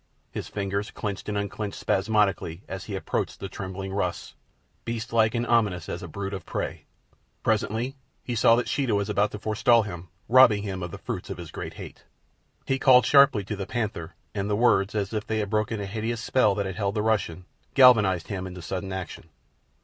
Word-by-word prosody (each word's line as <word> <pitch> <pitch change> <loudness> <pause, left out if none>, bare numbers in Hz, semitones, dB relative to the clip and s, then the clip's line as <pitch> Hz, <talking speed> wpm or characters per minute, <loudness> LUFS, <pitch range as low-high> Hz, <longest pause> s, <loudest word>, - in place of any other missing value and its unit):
His - - -5
fingers 100 0 -3
clenched 105 0 -5
and 105 - -1
unclenched 100 0 -4
spasmodically 100 -4 +1
as 95 -1 -6
he 100 - -5
approached 95 - -3
the 95 - -5
trembling 95 0 -6
Russ, 90 -3 -2 0.5
beastlike 115 -1 0
and 120 0 0
ominous 105 -8 +1
as - - -5
a - - -6
brute 100 0 -5
of 95 -3 -5
prey. - - -4 0.6
Presently 120 +6 0 0.3
he 120 - -4
saw 115 0 +5
that 120 - -1
Sheeta 130 -7 0
was 100 0 -1
about 105 +1 +2
to 105 - -7
forestall 110 +2 +3
him, 90 -3 -8 0.2
robbing 115 -5 +6
him 95 -3 -4
of 90 - -4
the - - -8
fruits - - -5
of - - -5
his - - -8
great - - -6
hate. - - -10 0.6
He 135 0 0
called 125 -2 +6
sharply 140 -7 +6
to 100 +2 -4
the 95 -1 -5
panther, 105 -9 -3 0.2
and 100 +1 -2
the 105 - +2
words, 105 -3 +3
as 100 0 -1
if 110 0 -3
they 110 - -1
had 105 -1 -2
broken 110 0 0
a 100 - -3
hideous 110 +3 -3
spell 110 -3 +2
that 100 0 -1
had 95 -1 -5
held 100 0 -1
the 105 - 0
Russian, 95 -5 0 0.3
galvanized 105 - +6
him 95 -2 -4
into 90 -1 -9
sudden 95 +2 -4
action. 90 -3 -6
105 Hz, 200 wpm, -26 LUFS, 95-110 Hz, 0.6 s, robbing